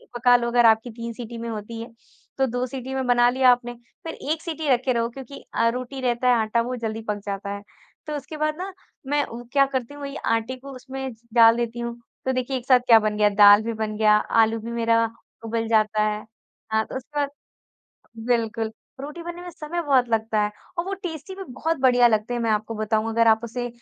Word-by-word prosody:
पका 245 +1 +5
लो 235 -1 +1
अगर 240 0 +3
आपकी 225 +2 +4
3 230 +1 -6
सीटी 235 0 -8
में 230 0 -5
होती 225 +1 -6
है, 230 - -7 0.5
तो 270 - +3
2 245 +1 -2
सीटी 260 0 -6
में 265 -1 -1
बना 240 0 +5
लिया 255 +1 +4
आपने, 245 0 -1 0.3
फिर 325 - -4 0.2
1 320 0 -1
सीटी 320 -3 -4
रखे 255 0 +2
रहो 230 -1 0
क्योंकि 270 +2 -10
अ, 230 - +2
रोटी 255 +3 -5
रहता 245 0 0
है 245 - +6
आटा 220 +2 +1
वो 250 +2 -3
जल्दी 225 -2 -4
पक 210 -1 -1
जाता 200 0 -4
है। 200 - -8 0.5
तो 300 - -3
उसके 300 +2 -7
बाद 305 0 0
ना 380 +2 -5 0.3
मैं 290 +1 +2
उ 235 +1 -9
क्या 275 -1 +5
करती 265 -1 -3
हूँ 290 - -11
वही 275 0 -6
आटे 230 +3 0
को 275 +2 -11
उसमें 265 +1 -6 0.2
डाल 230 -1 +7
देती 240 0 -3
हूँ। 235 0 -5 0.3
तो 260 - +1
देखिए 255 +1 -1
एक 245 - -8
साथ 255 -2 +6
क्या 230 -2 +8
बन 215 -1 -1
गया, 210 -1 +4
दाल 205 0 +7
भी 230 +1 -2
बन 215 -1 -3
गया, 215 -1 +5
आलू 225 +1 +2
भी 230 +2 -7
मेरा 230 -1 +2 0.4
उबल 225 0 -2
जाता 215 -1 +2
है 210 0 -2 0.5
हाँ, 220 0 +2
तो - - -9
उसके 290 +3 -6
बाद 285 -1 0 1.0
बिल्कुल, 225 -2 0 0.3
रोटी 300 +5 -7
बनने 345 +1 -7
में 355 - -7
समय 335 +1 -4
बहुत 265 -5 +3
लगता 220 -1 0
है 210 - 0 0.3
और 340 - 0
वो 390 - -3
टेस्टी 330 0 -6
भी 390 - -7
बहुत 325 +5 -1
बढ़िया 245 -2 +5
लगते 220 +2 0
हैं 240 - -2
मैं 230 -1 0
आपको 215 +1 -1
बताऊँ 215 0 0
अगर 230 0 +3
आप 220 0 +5
उसे 245 +1 -4
240 Hz, 230 wpm, -24 LUFS, 225-265 Hz, 1.0 s, क्या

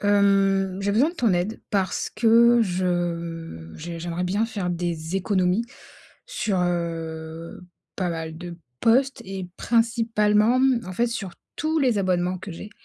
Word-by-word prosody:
Hem, 195 -2 +3
j'ai 200 +1 0
besoin 245 +9 +4
de - - -14
ton 235 - +2
aide, 180 +5 -1
parce 195 -3 0
que 235 +1 +5
je 170 - -2
j'ai 170 +2 -6
j'aimerais 170 +1 -3
bien 200 +5 +1
faire 200 -6 -3
des 170 0 -2
économies 190 +2 +1 0.6
sur, 215 - -1
heu, 165 -2 -3 0.4
pas 180 -2 -1
mal 160 -1 -5
de 175 -1 -7 0.2
postes 260 +4 +3
et 190 -1 -6
principalement, 230 0 +2
mmh, 260 -3 +3
en 185 - -5
fait, 235 +6 +1
sur 205 -6 -4 0.2
tous 315 +1 0
les 250 -6 +2
abonnements 185 -1 0
que 185 +1 -8
j'ai. 205 +5 -9
190 Hz, 150 wpm, -24 LUFS, 175-225 Hz, 0.6 s, que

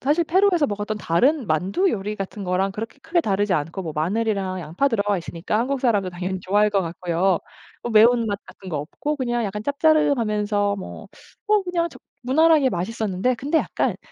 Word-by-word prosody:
사실 300 +5 +2
페루에서 360 -2 +3
먹었던 210 -1 -3
다른 250 - +2
만두 190 - +1
요리 210 -2 -3
같은 195 +1 -6
거랑 185 +2 0
그렇게 225 +6 -7
크게 330 +2 +1
다르지 205 - 0
않고 165 +5 -2
뭐 160 -3 -5
마늘이랑 190 +2 -1
양파 170 - 0
들어가 205 -4 0
있으니까 170 +3 -3
한국 260 +3 -1
사람도 205 -7 +1
당연히 185 +2 -4
좋아할 205 +3 +2
것 200 -2 +1
같고요. 175 +1 0 0.4
뭐 240 - -3
매운맛 225 -1 +4
같은 190 - -12
거 155 -5 -2
없고 240 - -4
그냥 240 -3 -1
약간 210 +1 -4
짭짜름하면서 220 -9 +1
뭐 195 - -8 0.4
뭐 425 -1 +3
그냥 350 -2 -1
적 - - -15 0.2
무난하게 300 +2 +4
맛있었는데 210 +4 -1
근데 280 +7 0
약간 - - -1
210 Hz, 405 characters per minute, -23 LUFS, 190-275 Hz, 0.4 s, 매운맛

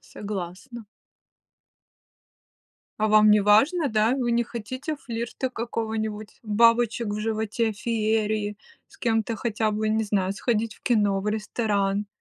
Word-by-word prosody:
Согласна. 205 +4 -7 2.1
А 215 - +1
вам 215 0 +6
неважно, 215 - +4
да? 220 +2 +2
Вы 245 -3 0
не 235 0 +3
хотите 255 +7 -5
флирта 235 0 -4
какого-нибудь, 220 -2 -4
бабочек 230 +1 +3
в 205 +1 -3
животе, 220 +1 -1
феерии, 215 -1 -1 0.3
с - - -19
кем-то 225 -1 0
хотя 220 -2 -1
бы, 215 +1 -1
не 220 +1 +1
знаю, 195 -2 0
сходить 225 +1 -1
в - - -25
кино, 205 -5 +2
в 205 - -3
ресторан. 210 -2 -1
220 Hz, 125 wpm, -25 LUFS, 210-235 Hz, 2.1 s, вам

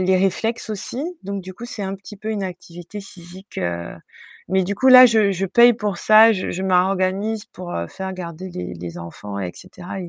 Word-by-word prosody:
les 185 0 +3
réflexes 220 +5 -1
aussi 215 +5 -5 0.2
donc 200 0 -4
du 185 +1 -9
coup, 240 - -8
c'est 225 -3 -6
un 195 0 -3
petit 195 +2 -12
peu 215 +2 -5
une 210 -2 -2
activité 175 +1 -8
physique. 185 0 -12
Heu, 85 -1 -3 0.5
mais 190 0 +2
du 200 - -2
coup 260 - +3
là, 255 0 +11
je 220 -4 +3
je 195 +1 -2
paye 240 +5 +6
pour 210 -4 -3
ça, 220 +1 +7
je 190 -3 -3
je 190 - -4
m'organise 190 +3 +1
pour, 180 -1 -9
heu, 85 - -3
faire 190 0 -6
garder 180 0 -7
les 90 - -6
les 85 0 -8
enfants 100 +4 -8
et 90 -2 -3
cetera 185 +1 -9
et 175 - -7
190 Hz, 215 wpm, -21 LUFS, 175-210 Hz, 0.5 s, là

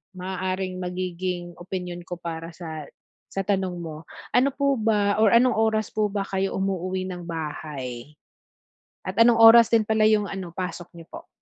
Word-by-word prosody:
maaaring 185 0 -3
magiging 180 -1 -4
opinyon 180 -1 -5
ko 175 - -4
para 165 -1 -7
sa 160 -4 -7 0.4
sa 195 - -3
tanong 190 -2 -1
mo, 160 -1 -7 0.3
ano 265 +3 +3
po 280 -3 +1
ba 210 -1 +2
or 220 -2 +5
anong 250 0 +4
oras 220 -1 +1
po 215 -1 +1
ba 200 -1 -2
kayo 195 0 -2
umuuwi 190 -1 -2
ng 180 -1 -6
bahay? 150 -5 -6 0.9
At - - -6
anong 230 -1 +5
oras 230 0 +9
din 230 -2 +4
pala 220 0 +3
yung 215 -2 +3
ano 190 -3 -6
pasok 175 -2 -5
niyo 165 -1 -12
po? - - -10
185 Hz, 165 wpm, -24 LUFS, 175-210 Hz, 0.9 s, oras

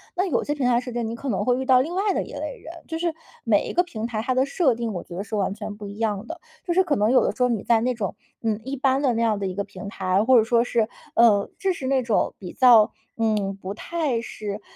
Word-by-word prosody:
那 370 +1 +1
有 310 -11 0
些 295 - -2
平 280 -3 -1
台 240 -1 +3
设 250 0 -6
置 240 - -3
是 - - -1
你 225 +1 -3
可 270 +4 -5
能 205 -2 -1
会 245 0 +2
遇 265 - -3
到 255 -1 +6
另 320 +6 -3
外 395 +2 +1
的 - - 0
一 - - -11
类 - - -5
人， 335 -6 -10
就 325 - -3
是 335 -1 -1 0.3
每 215 -4 +2
一 - - -4
个 355 - +3
平 230 -11 -5
台， 220 -3 -3
它 255 +3 0
的 260 +1 +2
设 280 -2 +2
定 230 -1 -3
我 175 - -5
觉 175 - -10
得 195 - -3
是 215 +1 -5
完 195 -1 0
全 210 0 -7
不 205 -1 -8
一 200 +1 -9
样 215 -2 -1
的。 - - -7 0.3
就 345 - 0
是 375 - +4
可 310 -5 +1
能 215 0 +2
有 260 - +5
的 - - -1
时 250 - +1
候 250 - +3
你 225 -4 0
在 230 -1 +3
那 250 +2 +1
种， 215 -5 -4 0.3
嗯， 220 -2 -1
一 265 +3 -4
般 270 0 +1
的 265 -4 +2
那 230 - -1
样 220 -3 +2
的 195 - -2
一 185 - -4
个 200 - -1
平 195 0 -9
台， 190 0 0
或 255 0 +6
者 225 - +6
说 235 +1 +3
是， 230 -2 0 0.3
呃 215 -4 +5
就 390 -2 0
是 265 -6 -5
那 270 -1 +2
种 230 -3 +1
比 180 -3 -7
较， 235 -4 +6 0.3
嗯 210 -4 0
不 190 +2 -5
太 295 -1 -2
是， 210 -2 -6
235 Hz, 320 characters per minute, -24 LUFS, 210-265 Hz, 0.3 s, 到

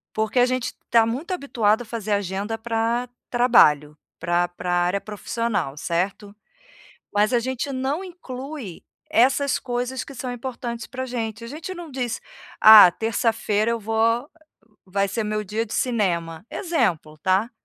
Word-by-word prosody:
Porque 220 +3 +1
a 245 - +6
gente 255 -1 -1 0.2
está 230 -1 +4
muito 265 +11 -3
habituado 235 - +1
a - - -7
fazer 220 -2 -5
agenda 200 +3 -2
para 230 +2 -1 0.2
trabalho, 150 - +4 0.2
para 175 +1 +1
para 175 0 -5
área 175 +3 +1
profissional, 210 -7 -3
certo? 190 +6 -2 0.8
Mas 210 +3 +2
a 240 - +3
gente 260 +3 -3
não 270 +7 -2
inclui 275 - -8 0.3
essas 265 +4 +3
coisas 250 +1 -3
que 275 - -11
são 250 0 -4
importantes 240 -1 -5
para 260 0 -5
gente, 230 -3 -4
a - - -7
gente 315 +7 -6
não 345 -3 -9
diz: 250 -4 -3 0.4
"Ah, 215 -3 +11
terça-feira 225 0 0
eu 230 - -2
vou 220 +1 -4
há 230 +4 +2 0.6
vai 195 +1 0
ser 215 +3 -2
meu 215 0 -1
dia 215 +3 -3
de 210 - -7
cinema." 175 -7 -1
Exemplo, 200 - -1
tá? 190 +7 +1
230 Hz, 155 wpm, -23 LUFS, 200-250 Hz, 0.8 s, Ah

